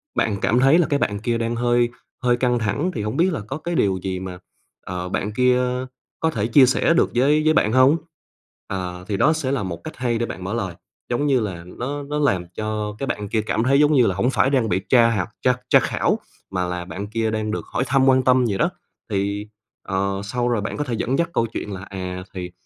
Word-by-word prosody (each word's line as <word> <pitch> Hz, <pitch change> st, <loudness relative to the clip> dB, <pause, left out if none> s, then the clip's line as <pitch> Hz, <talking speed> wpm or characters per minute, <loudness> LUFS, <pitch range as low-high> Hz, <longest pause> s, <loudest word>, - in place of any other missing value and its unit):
bạn 105 Hz, -2 st, +1 dB
cảm 120 Hz, +3 st, +3 dB
thấy 135 Hz, +5 st, +5 dB
là 170 Hz, -, +3 dB
cái 145 Hz, -2 st, +1 dB
bạn 100 Hz, -1 st, -1 dB
kia 115 Hz, +1 st, -1 dB
đang 115 Hz, 0 st, -1 dB
hơi 120 Hz, 0 st, +2 dB, 0.3 s
hơi 120 Hz, -1 st, +3 dB
căng 125 Hz, -1 st, +1 dB
thẳng, 115 Hz, -, -1 dB
thì 110 Hz, -, -2 dB
hổng 105 Hz, +1 st, -3 dB
biết 175 Hz, +1 st, +3 dB
là -, -, -2 dB
có 135 Hz, +3 st, -4 dB
cái 170 Hz, +2 st, -4 dB
điều 95 Hz, -9 st, +2 dB
gì 95 Hz, -1 st, -2 dB
mà, 90 Hz, -1 st, -6 dB, 0.5 s
ờ, 90 Hz, 0 st, -4 dB
bạn 105 Hz, +2 st, -2 dB
kia 125 Hz, +1 st, +3 dB, 0.6 s
có 160 Hz, 0 st, +1 dB
thể 110 Hz, -5 st, -1 dB
chia 130 Hz, +3 st, +7 dB
sẻ 130 Hz, +6 st, +2 dB
được 170 Hz, -, +2 dB
với 145 Hz, +5 st, +4 dB
với 155 Hz, -, +5 dB
bạn 105 Hz, -7 st, +2 dB
hông? 130 Hz, +5 st, +5 dB, 0.7 s
Ờ, 90 Hz, -1 st, -5 dB
thì 100 Hz, -, -1 dB
đó 155 Hz, +10 st, +4 dB
sẽ 145 Hz, -4 st, -2 dB
là 135 Hz, -6 st, 0 dB
một 90 Hz, -3 st, -5 dB
cách 155 Hz, -, -8 dB
hay 120 Hz, -2 st, 0 dB
để 120 Hz, -, 0 dB
bạn 95 Hz, -, -7 dB
mở 100 Hz, -, -3 dB
lời, 95 Hz, -7 st, -3 dB, 0.3 s
giống 125 Hz, +4 st, 0 dB
như 135 Hz, -3 st, +3 dB
là 95 Hz, -6 st, -4 dB
nó 130 Hz, +11 st, -5 dB
nó 150 Hz, +1 st, -3 dB
làm 95 Hz, -12 st, +1 dB
cho 105 Hz, -1 st, -3 dB
cái 135 Hz, -, -3 dB
bạn 105 Hz, -1 st, -3 dB
kia 110 Hz, +1 st, +1 dB
cảm 110 Hz, +1 st, -1 dB
thấy 135 Hz, +3 st, +4 dB
giống 150 Hz, +1 st, +5 dB
như 125 Hz, -4 st, +5 dB
là 95 Hz, -, 0 dB
hổng 125 Hz, -, +1 dB
phải 135 Hz, -, +2 dB
đang 125 Hz, -6 st, +1 dB
bị 90 Hz, -, +1 dB
tra 120 Hz, -2 st, +6 dB
học 100 Hz, -1 st, -1 dB
tra 125 Hz, -1 st, +3 dB
tra -, -, +7 dB
khảo, -, -, 0 dB, 0.3 s
mà 90 Hz, -1 st, -1 dB
là 90 Hz, 0 st, -4 dB
bạn 100 Hz, +2 st, -6 dB
kia 110 Hz, 0 st, -1 dB
đang 110 Hz, -1 st, -2 dB
được -, -, -3 dB
hỏi -, -, -2 dB
thăm, 135 Hz, -1 st, +3 dB
quan 130 Hz, -1 st, +4 dB
tâm 125 Hz, 0 st, +4 dB
gì 100 Hz, -4 st, 0 dB
đó. 170 Hz, -, +2 dB, 0.4 s
Thì, 100 Hz, +1 st, -2 dB, 0.4 s
ờ, 95 Hz, 0 st, -1 dB
sau 120 Hz, +4 st, -1 dB
rồi 115 Hz, -4 st, +1 dB
bạn 105 Hz, -, -4 dB
có 145 Hz, -, 0 dB
thể 125 Hz, -4 st, -4 dB
dẫn 125 Hz, +4 st, 0 dB
dắt 170 Hz, -, +1 dB
câu 115 Hz, -, +2 dB
chuyện 105 Hz, -2 st, -5 dB
là, 95 Hz, -, -6 dB
à, 90 Hz, -2 st, -6 dB
thì 90 Hz, -1 st, -5 dB
115 Hz, 250 wpm, -22 LUFS, 100-130 Hz, 0.7 s, chia